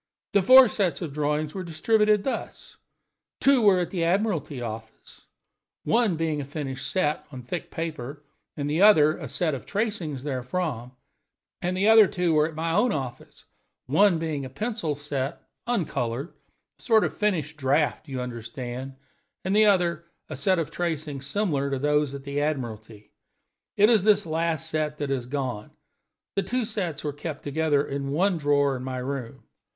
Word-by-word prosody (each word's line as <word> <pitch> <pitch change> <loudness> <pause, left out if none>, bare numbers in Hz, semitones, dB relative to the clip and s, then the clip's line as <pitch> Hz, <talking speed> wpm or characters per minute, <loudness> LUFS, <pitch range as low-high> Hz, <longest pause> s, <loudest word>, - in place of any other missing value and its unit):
The 200 - +5
four 255 +6 +9
sets 180 -8 0
of 150 -4 -5
drawings 150 +1 -1
were 190 - -4
distributed 210 +5 +2
thus: 265 - -5 0.6
Two 275 -2 +4
were 200 -4 +5
at 175 - -2
the 175 -3 -1
Admiralty 175 - 0
Office, 110 -1 -9 0.6
one 225 -6 +2
being 155 -2 -1
a - - -4
finished 140 -1 -5
set 150 -4 0
on 130 -3 -8
thick 165 +8 -5
paper, 150 -3 -5 0.3
and 145 -1 -2
the 155 +4 0
other 155 -7 +6
a - - -6
set 165 -4 -1
of 135 - -6
tracings 195 - -2
therefrom; 130 -2 -3 0.7
and 180 +1 -1
the 200 +3 +2
other 220 -2 +8
two 180 -3 0
were 155 0 +4
at 160 - -9
my 165 +1 -1
own 210 +8 +3
office, 130 -4 -6 0.4
one 175 +6 +4
being 160 -3 -3
a 130 - -6
penciled 205 - -3
set, 145 0 -4 0.2
uncolored 145 - -2 0.5
a - - -13
sort 225 -3 +4
of - - -2
finished 160 -8 -1
draft, 140 -1 +1
you 130 -2 -4
understand 125 +2 -6 0.5
and 190 +2 +1
the 215 0 +6
other 170 -4 +2 0.2
a - - -5
set 190 -2 +2
of 165 -3 -2
tracings 150 -5 -3
similar 145 -5 0
to 135 - -1
those 150 0 +1
at 140 - -8
the 140 +1 -2
Admiralty. 115 -8 -4 0.7
It 210 - +6
is 225 -3 +5
this 210 -1 +3
last 160 0 -1
set 155 -1 -2
that 145 -2 -3
has 125 -3 -2
gone. 125 -6 -3 0.7
The 195 - +2
two 240 +5 -1
sets 175 -9 -1
were 150 -1 -2
kept 145 +1 -6
together 145 0 +1
in 140 0 -4
one 175 +5 +1
drawer 145 -2 +2
in 125 - -6
my 130 0 -4
room. 130 0 -5
155 Hz, 170 wpm, -26 LUFS, 140-185 Hz, 0.7 s, four